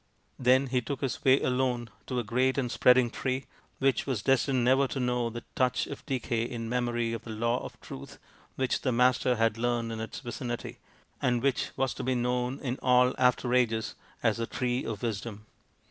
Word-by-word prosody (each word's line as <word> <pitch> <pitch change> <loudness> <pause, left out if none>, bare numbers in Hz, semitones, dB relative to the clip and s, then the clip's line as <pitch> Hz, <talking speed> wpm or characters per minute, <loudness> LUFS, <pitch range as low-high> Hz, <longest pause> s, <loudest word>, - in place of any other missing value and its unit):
Then 130 +2 +4
he 125 -1 0
took 135 +2 -5
his 135 -3 -2
way 130 +1 +6
alone 125 -3 0 0.2
to 130 - -2
a 120 - 0
great 130 +4 +1
and 125 -3 0
spreading 125 -1 +5
tree, 130 0 -2 0.3
which 135 0 +1
was 120 -7 -1
destined 135 -1 +2
never 135 +2 +4
to 135 - -4
know 125 -1 0
the 120 +1 -7
touch 125 -1 +1
of 140 - -8
decay 125 -3 -1
in 115 -1 -4
memory 120 -1 0
of 115 - -5
the - - -10
Law 115 +2 0
of - - -9
Truth 65 - -9 0.4
which 130 -1 0
the 130 - 0
Master 125 +1 +3
had 115 -1 +1
learnt 120 -1 0
in 110 - -4
its 110 - -5
vicinity, 120 -2 -5 0.4
and 120 -1 +1
which 140 -2 +1
was 135 -1 0
to - - -6
be 130 0 +1
known 125 +1 -1
in 130 -2 -3
all 125 0 +4
after 125 -1 +2
ages 115 -3 +1 0.3
as 115 -2 +2
the 115 0 -2
Tree 125 +1 -1
of 110 -2 -5
Wisdom. 105 -1 -4
125 Hz, 195 wpm, -29 LUFS, 115-130 Hz, 0.4 s, way